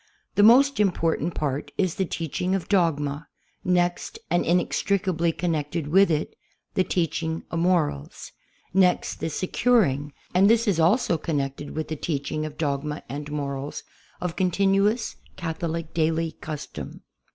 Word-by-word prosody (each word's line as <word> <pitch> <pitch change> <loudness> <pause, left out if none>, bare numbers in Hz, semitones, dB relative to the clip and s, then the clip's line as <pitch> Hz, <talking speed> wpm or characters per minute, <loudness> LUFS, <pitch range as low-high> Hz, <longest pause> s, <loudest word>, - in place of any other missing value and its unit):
The - - +3
most 260 +6 +6
important 175 -4 +1
part 145 -1 -2
is 185 -4 +1
the 190 - -1
teaching 175 +3 -2
of 190 - -3
dogma; 150 -6 +1 0.4
next, 175 -1 0
and 175 - +3
inex 175 +1 +2
tricably 180 -4 +1
connected 160 -2 -2
with 195 +4 +5
it, 155 -2 -1 0.4
the 185 - +2
teaching 160 -2 -1
of 165 - -1
morals; 165 - 0 0.4
next, 185 -1 +2
the - - -2
securing 160 - +1 0.2
(and 190 +3 +5
this 230 +1 +3
is 190 -5 +2
also 170 0 +3
connected 145 -3 -3
with 155 0 -2
the 160 - -3
teaching 155 0 -2
of 150 -1 -11
dogma 150 -1 -2
and 145 +1 -5
morals) 140 -1 -4 0.4
of 180 -2 -3
continuous 195 +4 +1 0.2
Catholic 165 -1 -4
daily 165 0 +1
custom. 155 -1 -7
165 Hz, 140 wpm, -25 LUFS, 150-185 Hz, 0.4 s, most